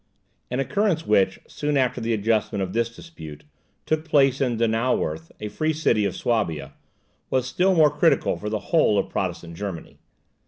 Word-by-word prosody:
An 125 - -2
occurrence 165 - 0
which, 100 -2 +2
soon 145 -1 -2
after 130 -2 +1
the 115 +1 -1
adjustment 105 -2 0
of 95 - -5
this 115 0 -1
dispute, 80 - -11 0.4
took 155 0 0
place 140 -4 +3
in 125 -4 +1
Donauwerth, 110 -9 0
a 105 - -4
free 155 +8 -1
city 115 -9 +1
of 100 - -2
Suabia, 80 - -1 0.6
was 130 -1 +1
still 180 +8 +2
more 155 -3 +5
critical 150 +3 +2
for 105 - -5
the 110 - -1 0.2
whole 130 -10 +4
of - - 0
Protestant 85 -1 -4
Germany. 95 -3 -7
115 Hz, 165 wpm, -24 LUFS, 100-150 Hz, 0.6 s, more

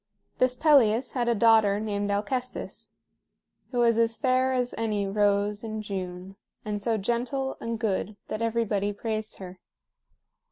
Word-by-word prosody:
This 255 0 +3
Pelias 255 -5 +4
had 245 -2 -1
a 235 - +2
daughter 220 -2 +4
named 205 -1 -2
Alcestis, 215 +5 -4 0.7
who 250 - -5
was 230 -1 +3
as 230 0 +2
fair 260 -1 +2
as 250 -1 0
any 215 -3 -1
rose 205 +1 +1
in 220 -1 -4
June 185 -1 -6 0.3
and 210 -1 -3
so 225 +2 0
gentle 245 +6 -2
and 230 0 -3
good 215 -1 -2
that 215 - -4
everybody 220 -3 0
praised 215 0 -3
her. 185 -1 -10
220 Hz, 145 wpm, -27 LUFS, 205-235 Hz, 0.7 s, Pelias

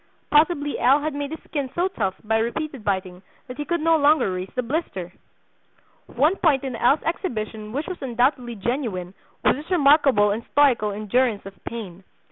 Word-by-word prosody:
(Possibly 295 -1 +2
L. 270 +5 +4
had 310 0 -2
made 285 0 -3
his 320 - -8
skin 285 -4 -3
so 350 +2 +2
tough 200 - -2
by 220 +1 +1
repeated 265 +2 -3
biting 185 -2 -2 0.3
that 250 0 -8
he 295 - -4
could 340 0 -1
no 330 +1 +4
longer 290 -7 +3
raise 185 +1 -4
the 250 - 0
blister!) 230 - -4 0.9
"One 300 +10 +1
point 285 -6 +2
in 260 -3 -4
L.'s 260 +6 +2
exhibition 220 - -4
which 285 +6 -3
was 370 - -7
undoubtedly 245 -1 0
genuine 200 -5 -3 0.3
was - - +4
his 300 +3 -10
remarkable 280 - +4
and 220 +3 -3
stoical 260 -7 +4
endurance 215 +2 0
of 195 - -8
pain. 195 -6 -7
255 Hz, 175 wpm, -23 LUFS, 215-295 Hz, 0.9 s, L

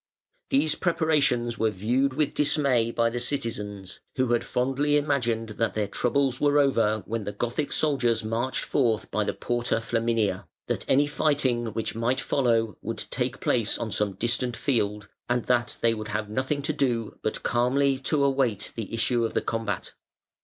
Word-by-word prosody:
These 145 +3 +3
preparations 150 - +1
were 110 0 +3
viewed 120 +7 0
with 150 +1 0
dismay 140 -6 +2
by 115 0 +1
the 120 - -2
citizens, 105 -7 -3 0.2
who 130 -2 +1
had 120 0 +2
fondly 135 +4 +1
imagined 120 -6 0
that 115 -2 0
their 105 -1 +1
troubles 130 +4 0
were 145 0 +4
over 115 -7 +2
when 115 -1 -3
the 105 - -4
Gothic 120 +7 -2
soldiers 120 -7 +1
marched 115 +4 -1
forth 115 -6 0
by 105 +1 +1
the - - -2
Porta 120 -1 -1
Flaminia; 115 -4 0 0.2
that - - -3
any 140 +2 +5
fighting 140 -5 +1
which 110 0 -3
might 115 +3 0
follow 115 - +1
would - - -4
take - - -2
place - - +1
on - - -4
some 105 -2 0
distant 120 +4 -1
field, 105 -7 -1 0.2
and 120 0 +1
that 120 -2 +1
they 115 -1 +3
would 110 -1 -5
have 105 -1 -3
nothing 130 +5 -1
to 155 - 0
do 120 -7 -1
but - - -3
calmly 130 +3 +2
to 140 +2 0
await 130 -7 +1
the 110 -3 -5
issue 120 +1 +1
of 115 - -2
the - - +4
combat. 110 -5 -3
120 Hz, 170 wpm, -26 LUFS, 115-140 Hz, 0.2 s, any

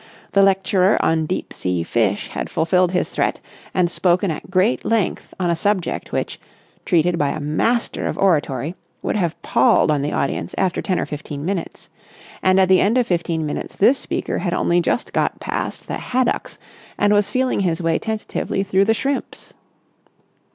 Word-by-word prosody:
The 200 - +4
lecturer 195 0 +3
on 160 -1 +1
deep 185 - -3
sea 90 -2 -1
fish - - 0
had - - -4
fulfilled 180 +2 +2
his 180 - -1
threat - - 0 0.3
and 180 -2 +2
spoken 180 +1 +1
at 155 - -7
great 190 +5 +2
length 225 -4 -1
on 175 -2 +1
a - - +1
subject 190 +1 -1
which, - - -3 0.5
treated 175 -1 +2
by 145 - +2
a - - -3
master 155 +11 0
of - - -3
oratory, 150 -5 +1 0.3
would - - -1
have 175 -5 -1
palled - - +3
on 145 -2 +1
the 145 +2 -2
audience 90 -10 -2
after 185 -2 0
ten 185 -3 0
or - - -1
fifteen 145 -1 -6
minutes; 185 -2 -4 0.5
and 185 0 +4
at 190 - +5
the 185 0 +5
end 220 +5 +2
of 250 - +3
fifteen 170 -3 -1
minutes 150 - -5
this 255 +7 +4
speaker - - -3
had - - -1
only 175 0 +2
just 205 - -1
got - - 0
past - - -4
the - - -4
haddocks 255 0 -1 0.4
and 205 0 +3
was 205 -1 +2
feeling 260 0 0
his 175 -4 0
way 165 -2 +1
tentatively 220 -3 -2
through 195 0 +2
the 225 +2 +3
shrimps. 275 +4 -3
185 Hz, 180 wpm, -20 LUFS, 165-200 Hz, 0.5 s, at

